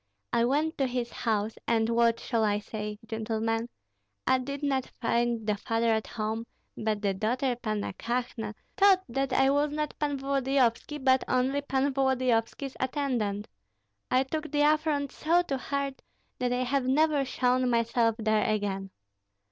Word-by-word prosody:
I 235 Hz, -, +3 dB
went 300 Hz, +6 st, 0 dB
to 270 Hz, -, +2 dB
his 245 Hz, -1 st, -3 dB
house, 215 Hz, -1 st, -1 dB
and 225 Hz, -1 st, +2 dB
what 230 Hz, 0 st, +3 dB
shall 230 Hz, -3 st, 0 dB
I 205 Hz, -1 st, +2 dB
say, 210 Hz, 0 st, -5 dB
gentlemen? 225 Hz, +1 st, -2 dB, 0.6 s
I 260 Hz, -, +4 dB
did 280 Hz, +3 st, -5 dB
not 270 Hz, -2 st, 0 dB
find 235 Hz, -1 st, 0 dB
the 210 Hz, -1 st, 0 dB
father 225 Hz, +2 st, 0 dB
at 220 Hz, 0 st, -1 dB
home, 225 Hz, 0 st, -3 dB, 0.3 s
but 215 Hz, -1 st, -2 dB
the 200 Hz, -1 st, +2 dB
daughter 245 Hz, +6 st, 0 dB
Panna 215 Hz, -3 st, -3 dB
Kahna 235 Hz, -3 st, -3 dB, 0.2 s
thought 390 Hz, -2 st, +5 dB
that 270 Hz, +2 st, -1 dB
I 270 Hz, +1 st, +4 dB
was 290 Hz, +1 st, +2 dB
not 300 Hz, 0 st, -2 dB
Pan 290 Hz, -2 st, 0 dB
Volodyovski, 270 Hz, 0 st, +1 dB
but 260 Hz, 0 st, +4 dB
only 260 Hz, +3 st, +1 dB
Pan 275 Hz, 0 st, 0 dB
Volodyovski's 260 Hz, 0 st, 0 dB
attendant. 245 Hz, -7 st, -1 dB, 0.6 s
I 255 Hz, +1 st, +3 dB
took 310 Hz, +3 st, -4 dB
the 295 Hz, -1 st, +2 dB
affront 300 Hz, -3 st, -1 dB
so 340 Hz, +3 st, +2 dB
to 275 Hz, -6 st, -2 dB
heart 280 Hz, 0 st, -3 dB, 0.4 s
that 250 Hz, -1 st, 0 dB
I 250 Hz, +1 st, +1 dB
have 260 Hz, 0 st, 0 dB
never 295 Hz, +1 st, +3 dB
shown 255 Hz, -1 st, +1 dB
myself 230 Hz, -1 st, +2 dB
there 220 Hz, -1 st, +2 dB
again." 200 Hz, -2 st, -1 dB
250 Hz, 155 wpm, -28 LUFS, 225-275 Hz, 0.6 s, thought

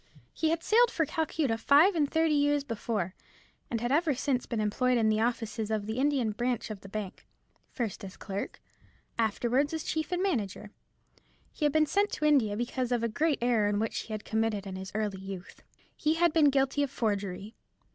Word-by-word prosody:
He 320 Hz, -, 0 dB
had 330 Hz, +1 st, -1 dB
sailed 475 Hz, +2 st, +5 dB
for 325 Hz, -, 0 dB
Calcutta 305 Hz, -7 st, -1 dB
five 300 Hz, -, +5 dB
and 300 Hz, -4 st, +1 dB
thirty 320 Hz, -1 st, +2 dB
years 290 Hz, 0 st, +2 dB
before, 220 Hz, -7 st, -3 dB, 0.6 s
and 230 Hz, -, -1 dB
had 240 Hz, +2 st, -2 dB
ever 305 Hz, 0 st, +2 dB
since 255 Hz, -1 st, -1 dB
been 235 Hz, -, -2 dB
employed 250 Hz, +4 st, +1 dB
in 220 Hz, -2 st, +3 dB
the 215 Hz, 0 st, +2 dB
offices 225 Hz, -2 st, -1 dB
of 215 Hz, -2 st, -1 dB
the 220 Hz, +3 st, -3 dB
Indian 270 Hz, -5 st, +2 dB
branch 240 Hz, +1 st, -2 dB
of 200 Hz, -3 st, -7 dB
the 195 Hz, -, -11 dB
bank; 205 Hz, -2 st, -6 dB, 0.4 s
first 225 Hz, -6 st, -4 dB
as 190 Hz, -1 st, -8 dB
clerk, 195 Hz, +1 st, -5 dB, 0.6 s
afterwards 245 Hz, +7 st, +1 dB
as 320 Hz, -, -3 dB
chief 315 Hz, +1 st, -2 dB
and 360 Hz, +1 st, 0 dB
manager. 210 Hz, -, -2 dB, 0.8 s
He 300 Hz, -, -2 dB
had 295 Hz, -, +3 dB
been 310 Hz, +1 st, +4 dB
sent 405 Hz, +7 st, +1 dB
to 305 Hz, -, -1 dB
India 245 Hz, -9 st, +3 dB
because 245 Hz, +1 st, -2 dB
of 240 Hz, -2 st, +1 dB
a -, -, +2 dB
great 290 Hz, +6 st, +1 dB
error 225 Hz, -4 st, +2 dB
which 215 Hz, +2 st, -1 dB
he 220 Hz, -, -6 dB
had 215 Hz, -1 st, -5 dB
committed 220 Hz, -2 st, -1 dB
in 190 Hz, -1 st, -6 dB
his 190 Hz, 0 st, -7 dB
early 205 Hz, -3 st, -2 dB
youth. 195 Hz, -1 st, -8 dB, 0.3 s
He 310 Hz, +1 st, +1 dB
had 340 Hz, -1 st, +3 dB
been 310 Hz, -3 st, +5 dB
guilty 270 Hz, +1 st, +1 dB
of 285 Hz, -, +1 dB
forgery. 205 Hz, -4 st, -2 dB
240 Hz, 195 wpm, -29 LUFS, 215-295 Hz, 0.8 s, sailed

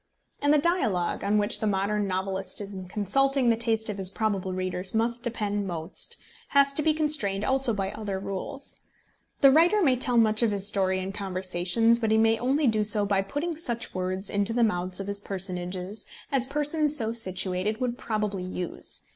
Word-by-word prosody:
And 290 Hz, -, +3 dB
the 300 Hz, -, +5 dB
dialogue, 250 Hz, -, 0 dB
on 205 Hz, +1 st, +2 dB
which 205 Hz, +1 st, +3 dB
the 215 Hz, -, -1 dB
modern 205 Hz, +1 st, 0 dB
novelist 190 Hz, 0 st, -2 dB
in 195 Hz, -2 st, -7 dB
consulting 250 Hz, +7 st, +1 dB
the 230 Hz, -, +4 dB
taste 225 Hz, -1 st, 0 dB
of 205 Hz, -2 st, -3 dB
his 190 Hz, -1 st, +3 dB
probable 195 Hz, -2 st, -2 dB
readers 185 Hz, +1 st, -2 dB
must 235 Hz, +2 st, 0 dB
depend 210 Hz, -4 st, -2 dB
most, 170 Hz, 0 st, -4 dB, 0.3 s
has 280 Hz, 0 st, +3 dB
to 305 Hz, -, 0 dB
be 315 Hz, -, +3 dB
constrained 295 Hz, -11 st, +1 dB
also 265 Hz, -2 st, +3 dB
by 195 Hz, -3 st, -2 dB
other 210 Hz, -3 st, -4 dB
rules. 195 Hz, +8 st, -6 dB, 0.6 s
The 275 Hz, -, +8 dB
writer 340 Hz, +8 st, +4 dB
may 275 Hz, -10 st, +3 dB
tell 250 Hz, -1 st, +1 dB
much 220 Hz, -1 st, +4 dB
of 230 Hz, -, +3 dB
his 200 Hz, -1 st, +2 dB
story 190 Hz, -2 st, +1 dB
in 190 Hz, +1 st, -4 dB
conversations, 190 Hz, +3 st, +1 dB
but 225 Hz, -2 st, 0 dB
he 220 Hz, -, +3 dB
may 225 Hz, 0 st, +3 dB
only 275 Hz, +5 st, +1 dB
do 220 Hz, -3 st, +2 dB
so 210 Hz, 0 st, +4 dB
by 200 Hz, -1 st, +1 dB
putting 290 Hz, -, -3 dB
such 235 Hz, -7 st, -2 dB
words 185 Hz, +1 st, -2 dB
into 205 Hz, +2 st, 0 dB
the 240 Hz, 0 st, +2 dB
mouths 180 Hz, -3 st, 0 dB
of 195 Hz, -, -3 dB
his 200 Hz, 0 st, -2 dB
personages 185 Hz, 0 st, -5 dB, 0.2 s
as 260 Hz, -2 st, 0 dB
persons 295 Hz, +1 st, +1 dB
so 225 Hz, -2 st, 0 dB
situated 190 Hz, -1 st, -2 dB
would 245 Hz, -2 st, -2 dB
probably 210 Hz, -4 st, -2 dB
use. 180 Hz, -1 st, -5 dB
210 Hz, 190 wpm, -26 LUFS, 190-245 Hz, 0.6 s, The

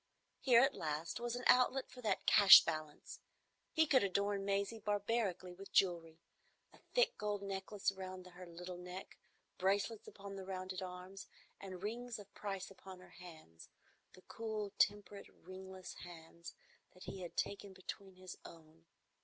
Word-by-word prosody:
Here 240 Hz, -3 st, +6 dB
at 270 Hz, -, +3 dB
last 155 Hz, +1 st, -3 dB
was 240 Hz, 0 st, -2 dB
an 245 Hz, -, -5 dB
outlet 255 Hz, +1 st, +4 dB
for 250 Hz, -, -11 dB
that 210 Hz, -5 st, 0 dB
cash 200 Hz, -3 st, +10 dB
balance. 155 Hz, -2 st, -5 dB, 0.5 s
He 320 Hz, -, +4 dB
could 265 Hz, -5 st, +4 dB
adorn 200 Hz, +1 st, 0 dB
Maisie 200 Hz, +3 st, -1 dB
barbarically 205 Hz, -3 st, -1 dB
with 195 Hz, +2 st, -11 dB
jewelry,—a 165 Hz, -3 st, -2 dB, 0.2 s
thick -, -, +3 dB
gold 205 Hz, -1 st, -2 dB
necklace 195 Hz, 0 st, -2 dB
round 185 Hz, -1 st, -7 dB
that 180 Hz, 0 st, -11 dB
little 175 Hz, +1 st, -7 dB
neck, 180 Hz, +1 st, -9 dB, 0.4 s
bracelets 200 Hz, +3 st, 0 dB
upon 200 Hz, 0 st, -9 dB
the 190 Hz, -, -6 dB
rounded 185 Hz, -1 st, -5 dB
arms, 185 Hz, +1 st, -8 dB, 0.3 s
and 185 Hz, -1 st, -8 dB
rings 240 Hz, +3 st, -4 dB
of 200 Hz, -1 st, -13 dB
price 195 Hz, -2 st, -5 dB
upon 190 Hz, -1 st, -11 dB
her 185 Hz, -, -15 dB
hands,—the 165 Hz, -, -15 dB
cool, 215 Hz, -2 st, -4 dB
temperate, 205 Hz, -1 st, +1 dB, 0.2 s
ringless 190 Hz, 0 st, -9 dB
hands 170 Hz, -1 st, -11 dB, 0.4 s
that 180 Hz, -, -12 dB
he 190 Hz, -, -7 dB
had 175 Hz, -, -8 dB
taken 200 Hz, 0 st, -2 dB
between 190 Hz, 0 st, -8 dB
his 185 Hz, 0 st, -10 dB
own. 165 Hz, 0 st, -14 dB
190 Hz, 145 wpm, -37 LUFS, 180-205 Hz, 0.5 s, cash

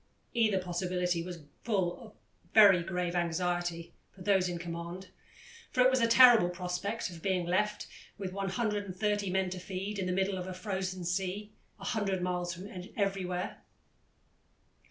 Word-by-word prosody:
Either 220 Hz, -4 st, +3 dB
possibility 180 Hz, -1 st, -1 dB
was 170 Hz, -2 st, -7 dB, 0.2 s
full 195 Hz, -3 st, 0 dB
of 220 Hz, -3 st, -12 dB, 0.4 s
very 200 Hz, -5 st, +8 dB
grave 180 Hz, 0 st, -2 dB
anxiety 175 Hz, -1 st, -1 dB, 0.2 s
for 190 Hz, -, -13 dB
those 190 Hz, -2 st, +3 dB
in 175 Hz, -, -3 dB
command, 170 Hz, +2 st, -6 dB, 0.6 s
for 255 Hz, -, +1 dB
it 255 Hz, +1 st, +6 dB
was 260 Hz, -1 st, +2 dB
a 230 Hz, -, +4 dB
terrible 230 Hz, -5 st, +8 dB
prospect 180 Hz, +4 st, -3 dB
of 165 Hz, -2 st, -10 dB
being 185 Hz, -2 st, 0 dB
left, 210 Hz, +4 st, 0 dB, 0.3 s
with 190 Hz, -2 st, -5 dB
130 205 Hz, 0 st, -1 dB
men 190 Hz, 0 st, 0 dB
to 185 Hz, -, -4 dB
feed, 195 Hz, +3 st, -4 dB
in 185 Hz, -, -1 dB
the -, -, 0 dB
midst 190 Hz, +2 st, +1 dB
of 185 Hz, -1 st, -3 dB
the 185 Hz, -1 st, -6 dB
frozen 185 Hz, -1 st, -3 dB
sea, 190 Hz, +4 st, -2 dB, 0.3 s
"a -, -, -9 dB
hundred 200 Hz, -4 st, 0 dB
miles 180 Hz, -1 st, -1 dB
from 180 Hz, +3 st, -7 dB, 0.3 s
everywhere." 190 Hz, -3 st, -2 dB
185 Hz, 155 wpm, -31 LUFS, 180-205 Hz, 0.6 s, very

